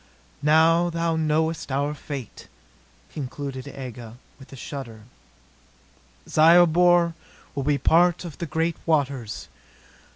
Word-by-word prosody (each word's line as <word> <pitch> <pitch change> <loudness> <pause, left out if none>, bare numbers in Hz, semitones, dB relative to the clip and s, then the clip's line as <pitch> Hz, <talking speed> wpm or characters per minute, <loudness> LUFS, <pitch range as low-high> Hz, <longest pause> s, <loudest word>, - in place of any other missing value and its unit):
"Now 160 +3 +4
thou 165 -1 -1
knowest 160 -1 -1
our 140 +2 -1
fate," 140 -4 -8 0.7
concluded 140 -1 -6
Aga 125 -4 -9 0.2
with 135 - -15
a - - -9
shudder. 125 -4 -8 1.3
"Zyobor 170 +1 +5 0.4
will 140 - -3
be 145 +2 +1
a - - -4
part 175 +5 +3
of 165 -4 -9
the 170 - -4
great 165 +3 -1
waters. 140 -8 -1
150 Hz, 110 wpm, -24 LUFS, 135-165 Hz, 1.3 s, Zyobor